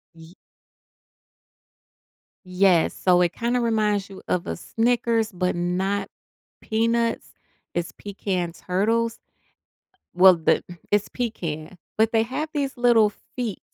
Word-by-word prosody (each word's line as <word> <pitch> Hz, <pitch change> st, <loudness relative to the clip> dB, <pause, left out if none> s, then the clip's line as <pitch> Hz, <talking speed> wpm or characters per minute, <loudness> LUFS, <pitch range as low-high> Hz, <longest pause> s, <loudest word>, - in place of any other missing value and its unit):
Y 165 Hz, +1 st, -15 dB, 2.1 s
Yes, 180 Hz, -2 st, +3 dB
so 180 Hz, -1 st, +3 dB
it 175 Hz, -1 st, +2 dB
kind 235 Hz, +1 st, -1 dB
of 250 Hz, -, +2 dB
reminds 210 Hz, -3 st, +1 dB
you 195 Hz, -, -11 dB
of 180 Hz, -, -1 dB
a -, -, -2 dB
Snickers 230 Hz, +2 st, 0 dB
but 180 Hz, 0 st, -1 dB
not 190 Hz, +3 st, -1 dB, 0.5 s
peanuts, 230 Hz, +1 st, 0 dB, 0.4 s
it's 175 Hz, 0 st, -2 dB
Pecans 185 Hz, -4 st, -4 dB
Turtles. 225 Hz, +5 st, +1 dB, 1.0 s
Well, 185 Hz, 0 st, +7 dB
the 160 Hz, -, +2 dB, 0.3 s
it's 205 Hz, 0 st, +2 dB
Pecan, 175 Hz, -9 st, -4 dB, 0.2 s
but 220 Hz, +1 st, +3 dB
they 225 Hz, -, +3 dB
have 260 Hz, +7 st, -3 dB
these 280 Hz, -2 st, -2 dB
little 235 Hz, -3 st, +4 dB, 0.3 s
feet 235 Hz, -6 st, -3 dB
205 Hz, 120 wpm, -24 LUFS, 180-230 Hz, 2.1 s, Well